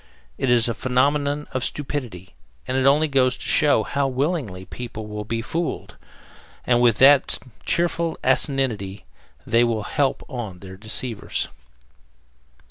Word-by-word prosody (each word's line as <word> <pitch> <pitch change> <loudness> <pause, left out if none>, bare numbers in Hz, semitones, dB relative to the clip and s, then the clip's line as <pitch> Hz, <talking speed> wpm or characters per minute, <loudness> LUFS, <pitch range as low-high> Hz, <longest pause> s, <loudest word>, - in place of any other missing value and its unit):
It 130 - 0
is 120 -1 +5
a 115 - 0
phenomenon 140 +4 0
of 130 - -2
stupidity, 125 -12 -5 0.3
and 130 - -2
it 130 0 +3
only 150 +3 +4
goes 130 -3 +2
to - - -9
show 145 -7 +3
how 140 +5 -1
willingly 130 - -2
people 115 -2 -7
will 105 0 -6
be 115 +1 -3
fooled, 165 +6 -4 0.7
and 120 -1 +3
with 120 -3 +3
what 140 +1 +6 0.3
cheerful 170 -1 0
asininity 110 -9 0 0.4
they 115 +1 +3
will 115 -3 0
help 140 +3 0
on 120 -9 -6
their 95 0 -11
deceivers. 110 +2 -4
125 Hz, 135 wpm, -23 LUFS, 110-140 Hz, 0.7 s, what